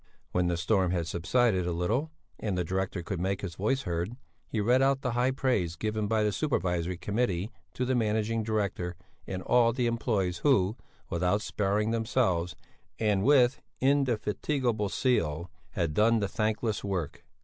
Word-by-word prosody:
When 90 -1 +1
the 85 -1 0
storm 95 +1 +2
had 85 -2 0
subsided 90 +3 +1
a - - 0
little 110 - -1 0.3
and 100 -4 -2
the 90 - +1
director 95 +1 -2
could 90 +1 -4
make 95 +2 -1
his 95 -4 -4
voice 110 +10 0
heard, 90 +7 -3 0.3
he 110 - -2
read 120 +5 +3
out 135 0 +3
the 125 - 0
high 120 +2 +2
praise 125 -11 0
given 110 +3 -2
by 110 0 +2
the 105 - +2
Supervisory 90 - -1
Committee 100 -1 -1 0.2
to 125 - -1
the 130 - +1
Managing 110 -1 +1
Director 100 -5 -2 0.3
and 95 -1 -4
all 115 -1 +4
the 125 0 0
employés 105 -7 0
who, 105 -8 +3 0.4
without 90 +5 +1
sparing 105 +2 0
themselves, 110 -7 0 0.4
and 105 -3 +1
with 130 -2 +4 0.2
indefatigable 125 -3 +1
zeal, 85 - 0 0.2
had 85 -4 -1
done 115 +6 +4
the 100 - 0
thankless 110 +1 -1
work. 95 -7 -3
105 Hz, 160 wpm, -29 LUFS, 90-120 Hz, 0.4 s, all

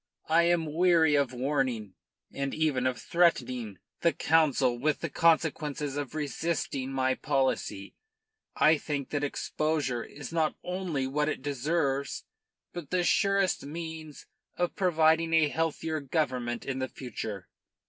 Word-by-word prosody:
I 170 +2 +5
am 170 -1 +2
weary 165 -2 +4
of 140 -3 +2
warning, 125 -6 -1 0.4
and 140 0 -3
even 145 -5 +1
of 130 -1 -2
threatening, 125 - +1 0.2
the 170 - +3
Council 140 -8 +2
with 150 +3 0
the 165 - -3
consequences 150 -3 +1
of 145 0 -4
resisting 145 -3 -2
my 130 -1 +1
policy. 130 -8 -1 0.6
I 155 0 +4
think 145 -3 -4
that 145 -1 -1
exposure 145 -3 -1
is 145 +1 -9
not 160 -2 +1
only 180 -7 -2
what 150 +3 0
it 130 - -4
deserves, 140 0 -1 0.5
but 170 -6 -7
the 180 -1 +1
surest 195 +2 +2
means 160 0 -7 0.3
of 175 -1 -1
providing 165 -2 +3
a 155 -2 +4
healthier 160 0 -1
government 130 -5 -2
in 130 -1 -3
the 130 -1 -2
future. 105 -6 -6
150 Hz, 135 wpm, -29 LUFS, 130-165 Hz, 0.6 s, I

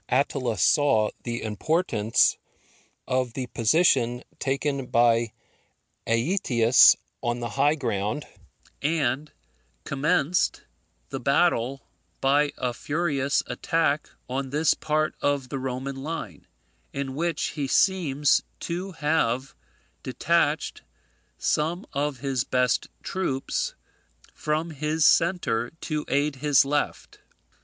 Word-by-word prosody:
Attila 130 -3 0
saw 110 +1 +3
the 120 -1 -4
importance 110 - +1 0.7
of 130 -2 0
the 130 +1 -3
position 125 0 +2 0.2
taken 135 -1 -1
by 115 -1 +3 0.8
Aetius 120 - +5 0.3
on 120 0 -1
the 120 -1 -4
high 140 +7 +2
ground, 115 -1 -2 0.6
and 150 -1 0 0.5
commenced 155 +4 +1 0.5
the - - -4
battle 130 +4 +1 0.3
by 145 +2 +3
a 125 -1 -2
furious 145 -1 0
attack 155 -2 0 0.2
on 135 +1 -3
this 150 +3 +3
part 155 0 -1
of 140 -3 0
the 135 - -3
Roman 130 +1 -4
line, 135 - -6 0.4
in 135 -1 -4
which 165 +4 -1
he 145 -3 -3
seems 150 -4 +3 0.2
to 180 +3 -4
have 145 -5 0 0.5
detached - - 0 0.6
some 165 +5 0
of 140 -2 -2
his 135 -4 0
best 125 -1 +1 0.2
troops 135 -9 -2 0.6
from 155 +2 -2
his 155 +1 0
centre 165 -10 +2
to 150 -2 -3
aid 145 0 0
his 145 0 +4
left. 145 +1 -2
140 Hz, 105 wpm, -25 LUFS, 125-155 Hz, 0.8 s, Aetius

